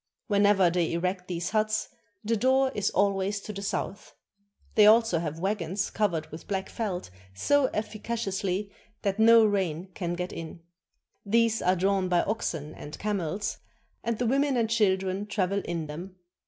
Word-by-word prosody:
Whenever 200 -4 +4
they 170 -2 0
erect 180 +2 -2
these 175 -1 -3
huts 215 0 +1 0.4
the 225 +2 +1
door 260 +3 +3
is 205 -1 0
always 200 0 +1
to 210 - -7
the 200 - -6
south. 200 0 -4 0.6
They 210 -1 +7
also 225 -5 +5
have 160 -1 -4
wagons 190 0 -2
covered 175 -7 0
with 160 - -9
black 190 -1 -2
felt 190 - -4 0.2
so 285 - +3
efficaciously 205 -3 -3 0.3
that 200 +1 -1
no 225 0 +7
rain 190 -4 -1
can 175 -3 -3
get 180 +1 -4
in. 165 0 -8 0.6
These 230 +1 +2
are 185 +1 +3
drawn 190 0 +1
by 175 -1 +3
oxen 160 -8 -3
and 150 - -9
camels, 200 -1 -2 0.4
and 235 -1 -1
the 245 - -1
women 275 +2 +2
and 225 -2 +1
children 195 -2 +1
travel 200 -1 0
in 170 -2 -3
them. 170 +5 -8
200 Hz, 155 wpm, -28 LUFS, 180-215 Hz, 0.6 s, They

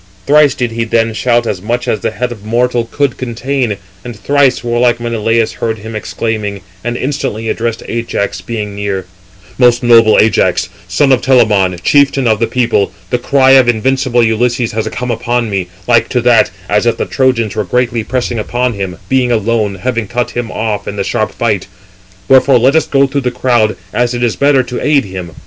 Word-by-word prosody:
Thrice 145 -1 +4
did 125 -4 -2
he 115 0 -2
then 115 0 0
shout 120 +1 +1
as 95 -5 -3
much 120 +4 -2
as 110 - 0
the - - -1
head 125 -1 -3
of 110 -4 -9
mortal 120 +1 0
could 140 -3 -1
contain, 125 -2 -2 0.3
and 120 -2 -7
thrice 135 +5 +1
warlike 120 0 +1
Menelaus 115 -1 0
heard 110 -1 -3
him 110 +1 -8
exclaiming, 105 -2 -3 0.2
and 120 +1 -3
instantly 125 -5 -3
addressed 115 0 -2
Ajax, 115 -4 -3
being 105 +1 -5
near: 100 -2 -3 0.5
"Most 120 -1 +4
noble 115 -2 +5
Ajax, 110 -3 +2 0.2
son 135 +10 +2
of 130 -2 +3
Telamon, 105 -9 +3
chieftain 140 -1 +3
of 110 -2 +2
the 115 - +1
people, 115 -4 0 0.2
the 125 - +1
cry 130 +1 +3
of 130 -2 +6
invincible 120 +1 +1
Ulysses 120 +1 0
has 110 0 -2
come 125 0 -4
upon 120 0 -1
me, 95 -3 -2 0.2
like 120 -1 +3
to 125 - 0
that, 120 -1 +4 0.2
as 105 +3 +1
if 120 - +1
the - - -2
Trojans 125 -5 0
were 105 - 0
greatly 120 +3 -1
pressing 120 -1 -2
upon 120 +3 -1
him, 95 -3 -5
being 130 -2 +1
alone, 110 -2 0
having 115 +2 -3
cut 120 +3 -2
him 120 -2 -4
off 105 -2 -3
in 100 - -4
the 100 - -2
sharp 110 - -1
fight. 105 -6 -1 0.6
Wherefore 135 0 +5
let 130 +5 +3
us 160 - +2
go 140 -1 +3
through 140 +1 -2
the 125 - 0
crowd, 120 -3 +1 0.2
as 120 0 0
it 120 - -2
is 120 -3 0
better 140 -2 +3
to 125 0 -5
aid 140 -1 +2
him. 95 -3 -8
120 Hz, 195 wpm, -13 LUFS, 110-125 Hz, 0.6 s, of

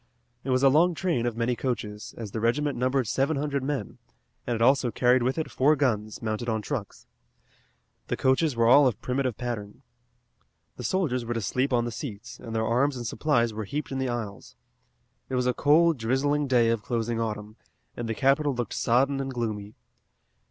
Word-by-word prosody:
It 135 - -5
was 130 +1 +2
a 135 - +7
long 165 +5 +4
train 155 -10 0
of 115 -1 -3
many 120 +1 0
coaches, 105 -5 -4
as 110 -4 -6
the 110 - -3
regiment 140 +6 +1
numbered 130 +1 +1
seven 135 +7 0
hundred 140 -1 -1
men, 135 -7 -4 0.5
and 120 - 0
it 115 - -4
also 130 0 +4
carried 125 +3 +3
with 130 +4 0
it 160 - -3
four 145 +4 +3
guns, 110 -7 -1
mounted 110 +2 -2
on 110 -1 -1
trucks. 120 -7 -5 1.0
The - - -2
coaches 130 +2 +2
were 115 0 +2
all 135 +4 +7
of 115 -4 -1
primitive 130 -2 -2
pattern. 110 -5 -5 0.9
The - - -8
soldiers 145 -10 0
were 120 +1 -3
to 115 - -1
sleep 130 +7 0
on 120 -1 +2
the 120 - -3
seats, 115 -1 -7
and 115 -1 -7
their 110 0 +1
arms 130 +4 +1
and 120 - -5
supplies 120 -2 +1
were 110 0 -4
heaped 145 +7 -4
in 135 - -2
the 130 -1 -1
aisles. 110 -5 -6 0.7
It 130 - -2
was 125 0 +1
a 125 - +2
cold, 155 +2 +4
drizzling 140 +5 +1
day 120 -3 +3
of 115 -2 0
closing 115 0 -2
autumn, 105 -1 -4 0.4
and 120 -1 -4
the 115 - -1
capital 140 +2 +2
looked 120 -3 -3
sodden 135 +4 +2
and 135 0 -3
gloomy. 110 -4 -4
125 Hz, 195 wpm, -27 LUFS, 115-135 Hz, 1.0 s, a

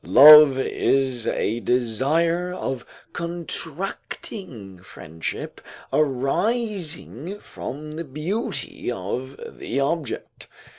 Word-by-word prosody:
["Love 150 -1 +9
is 130 -2 0
a 115 +3 0
desire 145 +10 +1
of 135 -8 -4 0.3
contracting 170 - -6
friendship 80 -3 -7 0.3
arising 170 - -1
from 150 -3 -7
the 160 +2 -5
beauty 155 - -3
of 125 +6 -5 0.2
the 135 - -2
object." 140 -1 -3
145 Hz, 80 wpm, -23 LUFS, 125-170 Hz, 0.3 s, Love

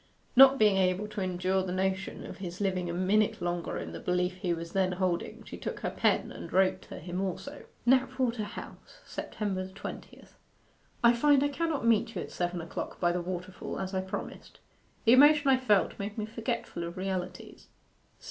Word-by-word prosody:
Not 270 +1 +9
being 210 -4 +4
able 185 +2 +1
to 210 - -4
endure 185 +1 0
the 185 -1 -3
notion 190 +1 -2
of - - -8
his 180 -2 -6
living 185 -3 -1
a - - -2
minute 200 +4 +2
longer 175 0 -2
in 85 - -5
the 85 - -7
belief 180 0 0
he 185 -2 -2
was 170 0 -3
then 185 -1 +2
holding, 180 -2 -2
she - - -9
took - - -5
her - - -2
pen - - +1
and - - -8
wrote 190 0 +3
to - - -7
him 180 +3 -4
also: 235 +10 -5 0.2
'KNAPWATER 255 -2 +2
HOUSE - - -10
September 190 -3 -3
20th. 190 - -9 0.7
'I 235 0 +7
find 280 +3 +4
I 285 - +2
cannot 310 -3 -1
meet 230 0 +2
you - - -2
at - - -10
seven 175 -1 -2
o'clock 165 - -6
by 175 -1 +3
the 175 0 -1
waterfall 180 +1 -5
as 190 0 -4
I 190 - 0
promised. 190 0 -7 0.5
The 230 - +7
emotion 290 +2 +7
I 265 - +6
felt 210 -7 +2
made 205 +2 -5
me 215 - -2
forgetful 230 -4 -4
of 170 +2 -6
realities. 185 -1 -5
190 Hz, 185 wpm, -30 LUFS, 180-235 Hz, 0.7 s, Not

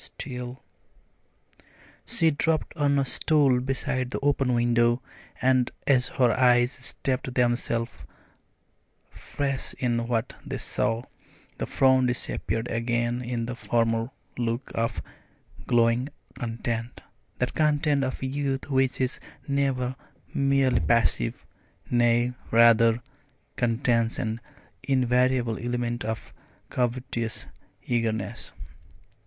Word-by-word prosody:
Still 125 -1 -7 0.7
" - - -29
She 165 -1 +3
dropped 155 +2 0
on 145 -2 +2
a 135 - +2
stool 140 -2 +3
beside 130 -1 -1
the - - -3
open 135 -3 +2
window, 120 0 +3 0.4
and 130 -1 +3 0.2
as 130 -3 +4
her 125 -3 +5
eyes 125 +1 +4
steeped 130 0 -2
themselves 120 -1 0 1.1
afresh 140 -2 -2
in 120 -2 0
what 120 0 -1
they 135 -2 -4
saw, 115 -1 -1 0.6
the - - -2
frown 130 -1 +4
disappeared 120 -1 -1
again 120 +1 0
in 120 -1 -2
the 125 +1 -4
former 115 -1 0 0.3
look 120 +2 -2
of 115 0 -1 0.6
glowing 120 +3 +3 0.2
content 115 0 -4 0.4
that - - -1
content 150 -2 +2
of 130 0 -3
youth 135 +1 -2
which 130 -1 +2
is 130 -1 -1 0.3
never 135 -2 0 0.4
merely 135 -2 +3
passive, 115 - +1 0.5
nay, 120 0 +3 0.2
rather, 115 0 +5 0.5
contains 115 -1 +1
an 115 -1 -3 0.4
invariable 125 -2 +2
element 120 -1 -2
of 110 +1 -5 0.4
covetous 120 -2 -2 0.4
eagerness. 115 -4 -2
125 Hz, 105 wpm, -26 LUFS, 115-130 Hz, 1.1 s, her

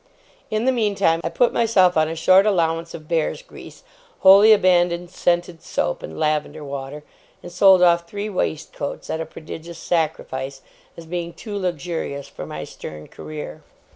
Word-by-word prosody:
In 215 +2 -1
the 260 - +4
meantime, 200 -8 +1
I - - -1
put 245 +7 +2
myself 190 -6 +3
on 155 -1 +3
a 165 - -4
short 185 +5 +5
allowance 165 -4 0
of 155 -2 -11
bear's 165 - -1
grease, - - -13 0.4
wholly 200 +3 +8
abandoned 175 -3 +3
scented 175 -2 -1
soap - - -2
and - - -8
lavender 155 0 -1
water, 140 +1 -7 0.4
and 175 - -9
sold 185 +1 +6
off 170 -1 +4
three 205 +2 -4
waistcoats 155 -7 -4
at 160 - -2
a 160 - -5
prodigious 160 +1 -9
sacrifice, 135 -5 -2 0.3
as 170 - -10
being 170 0 -4
too 210 -3 -8
luxurious 170 -6 -3
for - - -9
my - - -6
stern 75 0 -10
career. 150 - -8
170 Hz, 160 wpm, -22 LUFS, 155-190 Hz, 0.4 s, wholly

